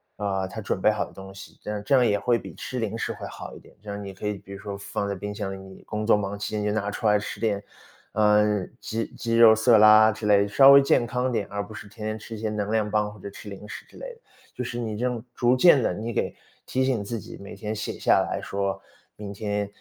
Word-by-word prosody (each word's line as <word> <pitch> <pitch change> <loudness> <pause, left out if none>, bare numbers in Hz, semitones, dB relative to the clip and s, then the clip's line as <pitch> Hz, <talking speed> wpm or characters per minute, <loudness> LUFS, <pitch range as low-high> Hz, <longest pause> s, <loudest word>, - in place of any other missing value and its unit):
啊， 95 -2 -2
它 110 +4 -7
准 100 - -2
备 - - +5
好 105 - 0
的 - - -15
东 95 0 -11
西， 100 - -12
这 - - -8
样 105 -1 -3
这 140 - +1
样 130 -2 +5
也 105 -3 +2
会 120 +2 +1
比 - - -10
吃 130 - -5
零 110 -1 -2
食 - - -2
会 - - -8
好 - - -9
一 - - -11
点。 - - -20
这 105 - -9
样 100 0 -5
你 100 -1 -7
可 95 - -9
以 105 0 -1
比 100 - -12
如 100 - -8
说 100 -1 -6
放 100 0 -4
在 100 - -2
冰 105 +2 -6
箱 100 -2 -4
里， - - -7
你 95 0 -13
工 105 0 -4
作 - - +6
忙 100 0 -3
期 105 - -4
间 105 - -1
就 105 - 0
拿 105 -1 -1
出 105 - -6
来 105 0 +4
吃 105 - -6
点， 105 -3 -1 0.5
嗯， 105 -2 +2
鸡 115 +1 -3
鸡 115 -1 -1
肉 115 -1 +9
色 110 +1 +5
拉 110 +1 +7
之 110 +1 -7
类， 100 -1 +4
稍 135 +7 +7
微 140 0 +9
健 135 -3 +3
康 125 +2 -1
点， 110 -4 -1
而 100 0 -2
不 105 - -14
是 105 - -9
天 105 +1 -7
天 110 0 -3
吃 110 +1 -9
一 - - -8
些 110 - -1
能 105 -1 -3
量 110 -1 +1
棒 105 0 0
或 105 - -15
者 100 - -7
吃 100 - -12
零 100 +1 -9
食 - - -8
之 - - -21
类 - - -8
的。 465 - -27 0.3
就 125 - -3
是 120 0 -5
你 110 -3 -3
这 120 - -1
种 125 -3 -2
逐 120 +1 +3
渐 140 0 +6
地 - - +1
你 110 +5 -4
给 - - -1 0.3
提 130 - 0
醒 130 -5 0
自 115 +3 -4
己， - - -10
每 100 - -10
天 105 +2 -4
写 105 - -4
下 - - +3
来 - - -3
说： 100 0 -2 0.4
“明 100 -1 -7
天， 105 0 -2
105 Hz, 305 characters per minute, -25 LUFS, 100-115 Hz, 0.5 s, 肉